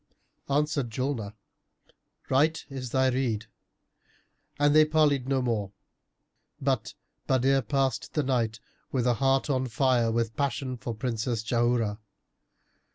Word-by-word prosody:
Answered 145 -3 +1
Julnar, 115 -3 -3 0.9
"Right 155 +5 +2
is 130 -2 -5
thy 130 +1 +2
rede;" 120 -4 -1 1.1
and 145 0 +3
they 155 - +8
parleyed 150 -4 +2
no 135 -1 +1
more: 105 -5 -1 0.9
but - - -1 0.3
Badr 135 +1 +3
passed 130 -1 -1
the 150 - +2
night 115 -4 0 0.3
with 125 -3 0
a 125 - +4
heart 135 +4 +2
on 130 -3 0
fire 125 -1 +2
with 115 -1 -1
passion 135 -2 -1
for 120 -1 -5
Princess 115 -1 -2
Jauharah. 115 -2 +1
130 Hz, 120 wpm, -28 LUFS, 115-135 Hz, 1.1 s, they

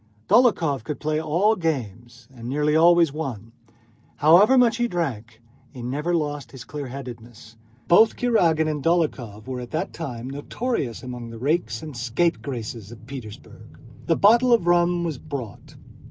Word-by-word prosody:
Dólokhov 180 - +3
could 150 +4 -5
play 155 0 -1
all 175 +8 +2
games 120 - -4
and 120 -1 -8
nearly 150 +2 +1
always 170 -2 +5
won. 120 -8 -6 0.6
However 180 - +6
much 235 -2 +4
he 240 0 +1
drank, 120 - -4 0.3
he 125 0 -10
never 150 +8 -1
lost 145 -3 -3
his 130 -3 -10
clearheadedness. 120 -5 -9 0.3
Both 220 +6 +5
Kurágin 170 -10 +2
and 150 -3 -3
Dólokhov 135 -11 -1
were 130 -1 -5
at 120 -1 -8
that 160 - -3
time 125 -7 -6
notorious 145 - -4
among 125 -2 -7
the 115 - -9
rakes 155 +7 -1
and 155 -3 -8
scapegraces 120 - -2
of 115 -1 -13
Petersburg. 125 -5 -11 0.3
The 165 - +3
bottle 235 +5 +5
of 230 -7 +4
rum 175 0 +2
was 160 -6 -3
brought. 135 -9 -8
150 Hz, 150 wpm, -23 LUFS, 120-170 Hz, 0.6 s, However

